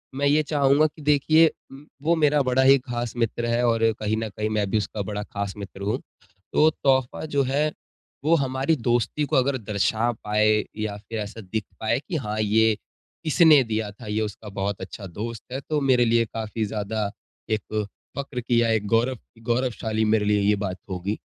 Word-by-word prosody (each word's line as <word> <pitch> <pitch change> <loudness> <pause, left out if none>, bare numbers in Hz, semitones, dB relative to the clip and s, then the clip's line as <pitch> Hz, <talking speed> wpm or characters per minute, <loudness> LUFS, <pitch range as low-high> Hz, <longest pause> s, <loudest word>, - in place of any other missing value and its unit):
मैं 140 +1 0
ये 150 +2 +4
चाहूँगा 145 0 +3
कि 155 +1 -14
देखिए 150 +3 +5 0.2
उम, 135 +2 -12 0.2
वो 165 +3 +2
मेरा 150 -2 +3
बड़ा 130 0 +2
ही 135 +1 +7
ख़ास 120 -2 -4
मित्र 115 0 -1
है 120 +1 +1
और 115 -1 +2 0.2
कहीं 110 0 0
न 110 0 -2
कहीं 105 +1 -3
मैं 105 -2 0
भी 110 - +1
उसका 105 0 -3
बड़ा 105 +1 -4
ख़ास 100 -1 -4
मित्र 100 -1 -9
हूँ। 105 +6 -1 0.5
तो 155 - +5
तोहफ़ा 130 +1 +2
जो 145 -3 +1
है, 145 +4 +1 0.5
वो 160 +3 +4
हमारी 135 +1 +1
दोस्ती 120 +2 0
को - - -1
अगर 130 +1 +2
दर्शा 110 +1 0
पाए 105 0 +3
या 110 -1 -2
फिर 110 +2 -6
ऐसा 105 +2 -6
दिख 105 +2 -3 0.2
पाए 110 +3 +1
कि 180 - -2
हाँ, 110 -7 -2
ये 110 +1 +3 0.5
इसने 155 -2 +6
दिया 110 -2 -2
था, 105 +2 -12
ये 105 +1 -1
उसका 105 0 -5
बहुत 100 0 -3
अच्छा 100 - -7
दोस्त 110 +6 -6
है, 130 - -3
तो 150 +2 -1
मेरे 130 -3 +4
लिए 115 0 +3
काफ़ी 110 0 -3
ज़्यादा 105 0 -2 0.4
एक 110 0 -1 0.3
फक्र 135 -3 -4
की 120 0 +2
एक 105 -1 -1
गौरव 120 +4 +2 0.3
गौरवशाली 115 -3 0
मेरे 110 -1 +2
लिए 105 0 +2
ये 105 +1 +3
बात 95 -2 -3
होगी। 95 +3 -3
115 Hz, 190 wpm, -24 LUFS, 105-135 Hz, 0.5 s, ही